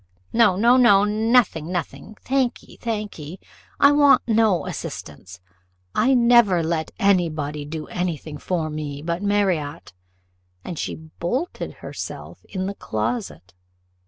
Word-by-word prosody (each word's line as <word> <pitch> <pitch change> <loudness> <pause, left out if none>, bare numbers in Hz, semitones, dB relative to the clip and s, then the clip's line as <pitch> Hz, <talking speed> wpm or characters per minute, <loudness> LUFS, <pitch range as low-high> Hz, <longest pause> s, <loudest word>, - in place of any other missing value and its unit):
"No, 225 -5 +4
no, 235 +6 +4
no 205 -6 +6
nothing, 210 -6 +2
nothing 185 +4 -5
thank 265 -2 0
ye, - - -16
thank 215 -5 -4
ye, 155 +5 -8 0.4
I 280 - +7
want 290 -3 +5
no 220 -5 +2
assistance 90 +6 -7 0.5
I 260 +5 +3
never 235 -8 +5
let 160 -1 -1
any 185 -4 +3
body 150 -1 -5
do 155 +1 -6
any 180 -3 -2
thing 150 0 -9
for 160 -3 -2
me 145 -2 -5
but 170 +2 -2
Marriott;" 190 - -1 0.7
and 170 - -6
she - - -3
bolted 175 - -4
herself - - -7
in 185 -1 -4
the 200 - -3
closet. 110 - -4
185 Hz, 135 wpm, -22 LUFS, 155-225 Hz, 0.7 s, I